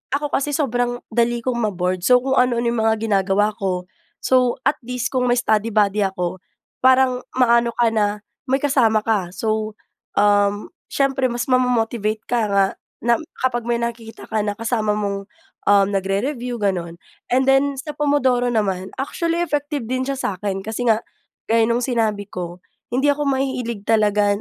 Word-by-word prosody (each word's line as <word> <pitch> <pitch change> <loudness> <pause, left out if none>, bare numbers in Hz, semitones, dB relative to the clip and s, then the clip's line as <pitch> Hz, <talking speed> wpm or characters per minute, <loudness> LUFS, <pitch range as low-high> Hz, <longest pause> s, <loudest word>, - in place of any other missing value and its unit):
ako 290 0 -2
kasi 290 +1 0
sobrang 245 -3 -1
dali 235 +1 +1
kong 245 -1 -1
ma-bored. 185 -4 -1
So, 250 0 +5
kung 265 0 +2
ano-ano 245 -1 +2
'yong 235 - -1
mga 220 0 +3
ginagawa 205 0 +2
ko. 185 -2 -1 0.4
So 255 -2 +3
at 300 - +2
least, 250 +1 -4
kung 250 -1 +1
may 245 - +3
study 220 -2 +1
buddy 210 -1 +2
ako, 185 -2 -2 0.4
parang, 255 -1 +4 0.2
ma-ano 235 -2 +4
ka 235 -2 +3
na 210 -1 0 0.3
may 265 - +3
kasama 230 -7 +3
ka, 205 -6 0
so, 215 +2 -2 0.4
um, 205 0 +2 0.2
siyempre 270 -1 +1
mas 240 0 -2
ma-mo-motivate 230 -4 +1
ka 245 - 0
nga 200 -1 +4 0.4
na, 235 +3 +3 0.2
kapag 240 -2 -1
may 235 - +2
nakikita 235 -1 -5
kang 215 -1 -1
kasama 220 -2 0
mong, 200 -1 -3 0.4
um, 200 -1 +5
nagre-review, 235 +6 -2
gano’n. 180 -5 -2 0.3
And 260 +2 +2
then 270 +1 +3
sa 300 +3 -6
Pomodoro 275 -4 +2
naman, 195 -5 -1
actually 335 +5 -1
effective 290 -4 -2
din 255 +3 -2
siya 275 - -2
sa’kin 195 -4 -3
kasi 225 +2 -1
nga, 225 +1 +2 0.4
gaya 225 0 +2
nung 235 +1 +1
sinabi 220 -5 0
ko, 180 -2 -7 0.3
hindi 280 +4 +2
ako 290 0 -1
mahilig 255 -6 -2
talaga 210 -2 +3
235 Hz, 160 wpm, -21 LUFS, 205-255 Hz, 0.4 s, So